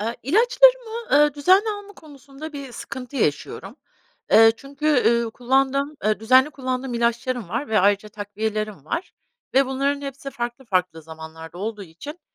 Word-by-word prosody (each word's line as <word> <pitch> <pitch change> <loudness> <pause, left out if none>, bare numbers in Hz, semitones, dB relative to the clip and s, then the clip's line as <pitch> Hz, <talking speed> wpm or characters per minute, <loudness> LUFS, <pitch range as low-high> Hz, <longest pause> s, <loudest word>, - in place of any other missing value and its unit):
Eee, 230 +3 -3
ilaçlarımı, 470 - +3
eee, 295 - -5
düzenli 375 +9 +4
alma 410 -1 -7
konusunda 290 -1 -12
bir 275 -3 -8
sıkıntı 260 +2 -8
yaşıyorum. 195 - -2 0.6
Eee, 225 0 +8
çünkü, 280 +4 -6 0.2
ııı, 235 0 +2
kullandığım, 270 +4 0
eee, 215 0 +1
düzenli 260 +5 +5
kullandığım 260 -2 -4
ilaçlarım 235 -2 -1
var 235 +8 -3
ve 220 - +2
ayrıca 200 +2 +2
takviyelerim 210 -3 -4
var 335 - -4 0.4
ve 270 +1 +5
bunların 275 +2 -1
hepsi 275 0 -7
farklı 240 +1 -5
farklı 180 -6 -1
zamanlarda 160 +1 -10
olduğu 210 +1 -4
için, 285 - -10
255 Hz, 145 wpm, -23 LUFS, 215-285 Hz, 0.6 s, Eee